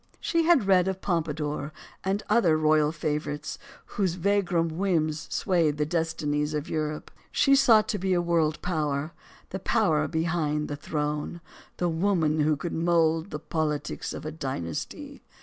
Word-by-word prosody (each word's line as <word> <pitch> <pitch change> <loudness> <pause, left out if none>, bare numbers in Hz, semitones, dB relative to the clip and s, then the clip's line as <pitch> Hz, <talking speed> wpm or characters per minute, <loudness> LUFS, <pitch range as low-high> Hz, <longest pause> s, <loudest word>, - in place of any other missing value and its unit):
She 335 -1 +1
had 320 - +4
read 190 -2 +4
of 190 -1 -2
Pompadour 155 -4 -2 0.3
and 195 +2 -1
other 190 -8 +4
royal 155 -1 +3
fav 150 -2 -1
orites 150 0 -6 0.3
whose 190 -4 -1
vagrom 180 -3 +1
whims 160 -5 0
swayed 165 -6 +1
the 150 - +1
destinies 155 -2 -1
of 150 +1 -3
Europe. 155 -1 -3 0.2
She 275 -1 +4
sought 230 -6 +5
to 210 - -1
be 190 +1 0
a 175 - +3
world 165 -3 +1
power; 155 -3 -1 0.4
the 190 - -3
power 165 -8 +2
behind 160 -2 -1
the 145 - -3
throne; 150 +2 -3 0.4
the 175 - 0
woman 165 -2 +1
who 150 0 +3
could 170 +4 -4
mold 165 0 +2
the 150 - -4
politics 150 -1 -3
of - - -7
a 155 - -3
dynasty. 130 - -5
160 Hz, 155 wpm, -27 LUFS, 150-180 Hz, 0.4 s, sought